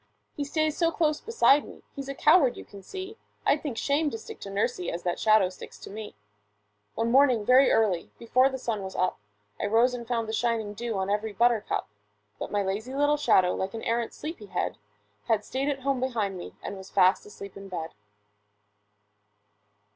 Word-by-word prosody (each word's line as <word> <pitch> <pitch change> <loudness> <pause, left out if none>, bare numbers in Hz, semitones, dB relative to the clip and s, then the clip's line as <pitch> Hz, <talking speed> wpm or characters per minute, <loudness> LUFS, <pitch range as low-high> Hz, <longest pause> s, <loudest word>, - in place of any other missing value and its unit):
He 290 - -2
stays 310 +1 0
so 335 -1 +2
close 310 -3 +1
beside 355 -11 +4
me, - - -13
he's 275 -1 -6
a 275 - -4
coward 300 -4 +4
you - - -9
can 200 - -12
see; 380 - -8 0.3
I'd 285 +1 +3
think 270 -7 -4
shame 290 +5 +1
to 225 - -5
stick 220 - -10
to 200 - -7
nursie 195 -2 -1
as 170 - -5
that 175 -1 -1
shadow 215 -4 +4
sticks 185 - -11
to - - -11
me! 215 +2 -6
MY - - -6
SHADOW - - -16
[Pg 105 0 -44
21] 225 - 0
One 230 - 0
morning, 255 -5 +4
very 260 +3 +6
early, 195 -7 +2
before 255 +3 +3
the 265 - -4
sun 230 -5 -3
was 190 0 -7
up, 185 - 0 0.4
I - - 0
rose 230 +4 +3
and 235 -2 -6
found 230 -2 -1
the 220 - -4
shining 225 -2 0
dew 230 0 -3
on 190 +1 -1
every 210 +1 -1
buttercup; 235 +1 +1 0.5
But - - -4
my 205 -1 +1
lazy 215 +7 -3
little 290 +1 +3
shadow, 185 -11 +4
like 190 +3 -3
an 225 - -6
arrant 230 0 -1
sleepy 305 -9 -7
head, 180 - -2 0.5
Had 210 -2 +1
stayed 270 +2 -1
at 275 -2 -2
home 275 -1 0
behind 225 -7 -1
me 175 - -8
and 200 - -5
was 190 0 -10
fast 185 0 +3
asleep 200 -1 -10
in 195 0 -10
bed. 165 -3 -5
225 Hz, 210 wpm, -27 LUFS, 195-270 Hz, 0.5 s, very